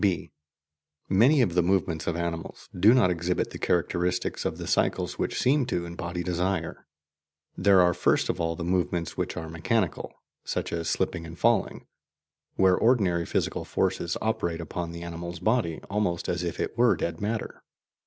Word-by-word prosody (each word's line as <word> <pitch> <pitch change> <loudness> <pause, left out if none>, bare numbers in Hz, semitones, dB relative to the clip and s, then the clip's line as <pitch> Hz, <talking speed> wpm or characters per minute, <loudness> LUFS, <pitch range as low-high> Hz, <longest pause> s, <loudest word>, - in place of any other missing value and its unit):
(b) 95 -4 0 0.8
Many 125 +9 +5
of 90 - 0
the 90 - +4
movements 85 -3 0
of 85 - 0
animals 85 -1 -4
do 95 +5 +6
not 110 -8 +4
exhibit 90 +1 -1
the - - -8
characteristics 90 +1 0
of - - -2
the - - -6
cycles - - 0
which - - -1
seem 140 +2 +3
to 90 -8 -1
embody 85 +1 -5
desire. 90 -1 -2 0.7
There 95 -1 +5
are 90 0 +3
first - - +2
of - - -2
all 80 0 -1
the 85 - -5
movements 90 -1 -1
which - - -3
are 80 - -4
"mechanical," 85 +4 -1 0.3
such - - -3
as 85 -1 -2
slipping 80 - -1
and 85 +1 -10
falling, 115 0 +1 0.7
where 95 -1 +4
ordinary 95 -9 +2
physical - - -1
forces - - -1
operate 110 -7 -1
upon 85 +1 -4
the 85 0 -7
animal's 85 0 -6
body 100 -3 0
almost 100 -4 -1
as 90 0 -1
if 85 -1 -4
it - - -2
were 120 -1 +5
dead 85 +1 -3
matter. 110 +2 -3
90 Hz, 170 wpm, -27 LUFS, 85-100 Hz, 0.8 s, do